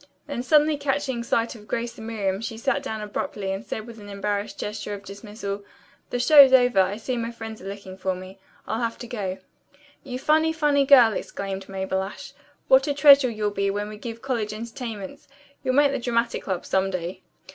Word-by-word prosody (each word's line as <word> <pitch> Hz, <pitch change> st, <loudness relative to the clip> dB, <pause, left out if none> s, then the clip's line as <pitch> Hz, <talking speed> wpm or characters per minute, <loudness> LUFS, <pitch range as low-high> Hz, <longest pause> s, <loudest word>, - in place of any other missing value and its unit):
Then 285 Hz, -5 st, -4 dB
suddenly 300 Hz, +3 st, +4 dB
catching 270 Hz, -3 st, -1 dB
sight 230 Hz, 0 st, 0 dB
of 210 Hz, -3 st, -14 dB
Grace 235 Hz, 0 st, -3 dB
and 220 Hz, -, -9 dB
Miriam 200 Hz, -3 st, -2 dB
she 225 Hz, -1 st, -5 dB
sat 275 Hz, +4 st, 0 dB
down 220 Hz, -6 st, -5 dB
abruptly 205 Hz, -1 st, -3 dB
and 195 Hz, +2 st, -4 dB
said 220 Hz, -, -5 dB
with 230 Hz, -1 st, -11 dB
an 205 Hz, -1 st, -11 dB
embarrassed 205 Hz, +1 st, -3 dB
gesture 210 Hz, 0 st, -4 dB
of 200 Hz, -, -11 dB
dismissal, 200 Hz, 0 st, -6 dB, 0.5 s
"The -, -, -2 dB
show's 280 Hz, +1 st, +8 dB
over. 245 Hz, -5 st, +5 dB
I 190 Hz, +2 st, 0 dB
see 250 Hz, +3 st, -3 dB
my 230 Hz, 0 st, -2 dB
friends 225 Hz, -2 st, -8 dB
are 190 Hz, -, -8 dB
looking 195 Hz, -1 st, -8 dB
for 190 Hz, 0 st, -1 dB
me. 185 Hz, +1 st, -10 dB, 0.3 s
I'll 225 Hz, -, -2 dB
have 230 Hz, -1 st, -2 dB
to 240 Hz, -, -8 dB
go." 200 Hz, -6 st, -4 dB, 0.7 s
"You 250 Hz, -2 st, -5 dB
funny, 315 Hz, +4 st, +2 dB
funny 290 Hz, -3 st, +2 dB
girl!" 250 Hz, -6 st, +7 dB
exclaimed 195 Hz, -1 st, -5 dB
Mabel 190 Hz, 0 st, -2 dB
Ashe. 270 Hz, +8 st, -8 dB, 0.3 s
"What 270 Hz, +1 st, +5 dB
a 285 Hz, -, 0 dB
treasure 280 Hz, -3 st, +7 dB
you'll 215 Hz, -2 st, -2 dB
be 200 Hz, 0 st, 0 dB
when 205 Hz, +1 st, -2 dB
we 215 Hz, -, -7 dB
give 230 Hz, 0 st, -7 dB
college 230 Hz, -5 st, -2 dB
entertainments. 225 Hz, -2 st, -7 dB, 0.4 s
You'll 255 Hz, -1 st, 0 dB
make 285 Hz, 0 st, +5 dB
the 275 Hz, -, -2 dB
Dramatic 235 Hz, -1 st, -1 dB
Club 185 Hz, -3 st, -3 dB
some 190 Hz, 0 st, +1 dB
day." 185 Hz, 0 st, -4 dB
225 Hz, 200 wpm, -25 LUFS, 200-255 Hz, 0.7 s, show's